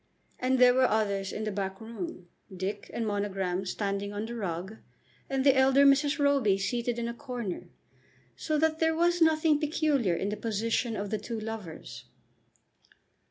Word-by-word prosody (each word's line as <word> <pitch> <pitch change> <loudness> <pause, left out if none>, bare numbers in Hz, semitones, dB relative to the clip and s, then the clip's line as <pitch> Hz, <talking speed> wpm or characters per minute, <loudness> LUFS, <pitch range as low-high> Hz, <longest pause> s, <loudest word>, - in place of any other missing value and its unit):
And 260 +1 +2
there 250 0 +7
were 255 0 +4
others 200 -3 0
in 215 - -4
the 215 - -2
back 195 -1 -3
room, 205 -5 -7 0.2
Dick 190 +2 -5
and 230 - -2
Monogram 195 -3 -2
standing 200 +1 -2
on 205 +1 -4
the 235 - -6
rug, 190 -1 -4 0.5
and 270 0 0
the 275 -1 +6
elder 265 +1 +5
Mrs. 280 +1 +4
Roby 280 -9 +3
seated 235 +4 -1
in 235 0 -2
a 235 - -3
corner; 240 -7 -6 0.7
so 310 -1 -1
that 315 +1 +1
there 320 0 +2
was 345 +1 +2
nothing 315 -1 +4
peculiar 295 - +1
in 195 - -2
the 210 - -3
position 225 +2 -1
of 205 -1 -4
the 215 - -1
two 230 -2 -5
lovers. 215 -7 -7
225 Hz, 165 wpm, -29 LUFS, 200-275 Hz, 0.7 s, there